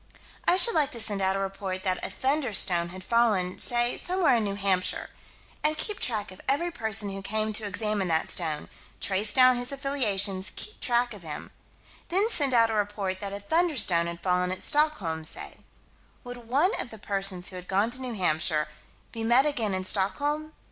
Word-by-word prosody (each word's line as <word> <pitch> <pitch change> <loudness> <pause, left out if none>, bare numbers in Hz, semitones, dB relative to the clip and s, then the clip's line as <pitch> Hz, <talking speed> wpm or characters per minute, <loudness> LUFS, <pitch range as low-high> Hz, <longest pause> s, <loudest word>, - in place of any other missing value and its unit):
I - - +5
should 465 +5 +9
like 300 -4 +2
to 235 - +1
send 210 -3 0
out 190 0 +1
a - - -2
report 195 -1 -4
that 185 -1 -1
a - - 0
"thunderstone" 220 - +1
had 185 +1 -8
fallen, 210 -5 +1
say, 240 0 +2
somewhere 355 -8 +3
in 225 - -1
New 200 -1 -3
Hampshire 195 -2 -1 0.5
And 305 0 +2
keep 420 +5 -3
track 210 -4 -2
of 185 - -12
every 340 +6 +1
person 220 -7 -1
who 195 0 -6
came 215 +2 -2
to 215 +1 -2
examine 205 -1 -1
that 160 -1 +1
stone 155 -4 -1 0.3
trace 200 +2 -1
down 255 -1 +5
his 245 +2 -1
affiliations 205 - -1
keep 430 - -7
track 240 -1 +1
of 205 - -11
him 155 -3 -8 0.6
Then 395 +6 +2
send 285 -8 +6
out 230 -2 +4
a - - -2
report 205 -2 -2
that 200 0 -5
a 200 - -5
"thunderstone" 210 - +1
had 170 0 -7
fallen 180 0 +1
at 185 - -4
Stockholm, 210 - +1
say 155 - -5 0.7
Would 245 -2 -10
one 295 - +2
of - - -7
the 220 - -11
persons 195 -3 -2
who 190 - -10
had 180 0 -9
gone 200 +4 0
to 255 +2 -3
New 250 -2 -5
Hampshire, 155 -4 0 0.4
be 225 - -6
met 240 +4 +4
again 225 -9 -1
in 185 - -3
Stockholm? 290 +12 -1
210 Hz, 195 wpm, -26 LUFS, 190-255 Hz, 0.7 s, should